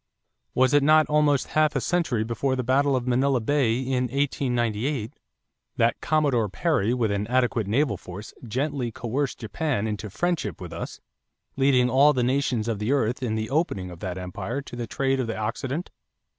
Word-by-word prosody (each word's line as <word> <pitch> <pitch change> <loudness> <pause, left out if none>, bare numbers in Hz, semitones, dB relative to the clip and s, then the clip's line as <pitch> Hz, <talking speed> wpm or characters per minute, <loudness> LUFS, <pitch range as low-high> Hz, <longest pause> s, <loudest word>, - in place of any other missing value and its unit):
Was 130 +2 +3
it 145 - +6
not 155 +2 +5
almost 150 -2 +3
half 155 -1 +2
a - - +2
century 145 -8 0
before 125 +4 -1
the 130 - -2
battle 135 +3 +2
of 125 -2 -1
Manila 130 +1 +2
Bay 120 -1 +1
in 130 -1 0
1898, 125 -2 -1 0.6
that - - +2
Commodore 140 -8 +2
Perry 120 - +1
with 120 -4 +1
an 100 +1 -1
adequate 125 -3 +1
naval 115 -1 +1
force 95 +4 -9
"gently 130 +1 -2
coerced 125 +4 -2
Japan 115 0 -2
into 105 0 -4
friendship 155 - -2
with - - -8
us," - - -6 0.6
leading 135 -2 +4
all 140 +4 +5
the 125 -3 0
nations 125 -3 0
of 110 -3 -1
the 105 +4 -1
earth 125 -3 +1
in 115 -4 -1
the 110 +2 -3
opening 120 - -1
of 85 - -10
that 90 0 -4
empire 95 +8 -4
to 130 - -9
the 120 -1 -4
trade 135 +2 0
of 125 - -1
the 115 - -3
Occident? 130 - -3
125 Hz, 180 wpm, -25 LUFS, 110-140 Hz, 0.6 s, it